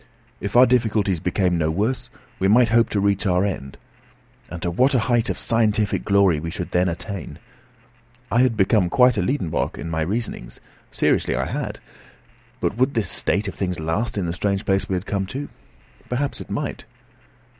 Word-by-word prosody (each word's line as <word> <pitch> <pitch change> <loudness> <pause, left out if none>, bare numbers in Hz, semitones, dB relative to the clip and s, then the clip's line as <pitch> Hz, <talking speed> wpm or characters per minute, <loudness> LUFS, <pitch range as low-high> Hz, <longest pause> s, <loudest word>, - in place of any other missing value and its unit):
If 100 +2 -5
our 125 +1 +8
difficulties 110 -7 +1
became 90 0 0
no 80 -1 +1
worse, 105 +10 -1 0.3
we 95 - +2
might 115 +3 +5
hope 115 0 +3
to 105 - 0
reach 100 +1 +1
our 90 +1 +2
end. 70 -9 -5 0.7
And 85 - -6
to 85 - -1
what 130 - +3
a - - +4
height 120 -1 +1
of - - -2
scientific 110 -2 +1
glory 100 -6 +3
we 80 +2 -5
should 90 +1 -5
then 90 +1 +2
attain! 90 +1 -6 0.9
I 115 +4 +4
had 125 -3 +2
become 95 -2 +3
quite 125 +4 +4
a 100 - 0
Liedenbrock 90 - -1
in 80 +3 -5
my 80 0 -1
reasonings; 110 +9 -3 0.3
seriously - - +1
I - - -1
had. - - -4 0.8
But 105 - -1
would 130 +2 +1
this 105 -6 +1
state 100 +2 0
of 95 - -4
things 90 -3 -3
last 80 +9 -2
in 95 - -1
the 85 - -2
strange 100 +2 -1
place 95 0 0
we 95 - 0
had 90 +2 -3
come 100 -2 -2
to? 140 +8 -5 0.6
Perhaps 135 +3 -2
it - - -10
might. - - -4
100 Hz, 190 wpm, -22 LUFS, 90-115 Hz, 0.9 s, our